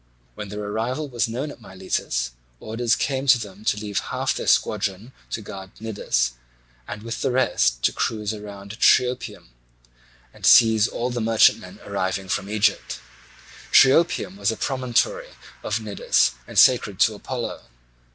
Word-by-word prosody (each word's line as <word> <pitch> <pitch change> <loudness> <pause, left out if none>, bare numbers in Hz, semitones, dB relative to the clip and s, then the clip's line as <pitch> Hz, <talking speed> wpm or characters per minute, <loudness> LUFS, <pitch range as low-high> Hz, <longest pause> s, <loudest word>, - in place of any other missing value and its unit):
When 105 -1 -8
their 105 +1 -6
arrival 115 +8 -3
was 120 -3 0
known 130 +6 -4
at 125 - -14
Miletus, 95 - -3 0.3
orders 115 +2 0
came 135 0 -2
to 130 -1 +7
them 105 -2 -9
to 105 - +1
leave 105 -1 -3
half - - -2
their - - -5
squadron 105 +6 0 0.2
to 110 - -5
guard 95 -1 -10
Cnidus, 105 - -1 0.6
and 105 0 -7
with 115 0 -5
the - - +1
rest 90 - +1
to - - +3
cruise 110 -1 -2
round 100 +1 -10
Triopium 125 - +2 0.8
and - - -18
seize 110 -2 +6
all 125 +1 -3
the 120 -1 -3
merchantmen 110 0 +2
arriving 95 +1 -3
from 100 +1 -2
Egypt. 105 -1 0 0.7
Triopium 135 - +4
is 100 0 +1
a 110 - -6
promontory 135 - -1 0.3
of - - -2
Cnidus - - +1 0.2
and - - -8
sacred 105 -6 +4
to 110 - +5
Apollo. 120 +3 -5
110 Hz, 150 wpm, -23 LUFS, 100-125 Hz, 0.8 s, to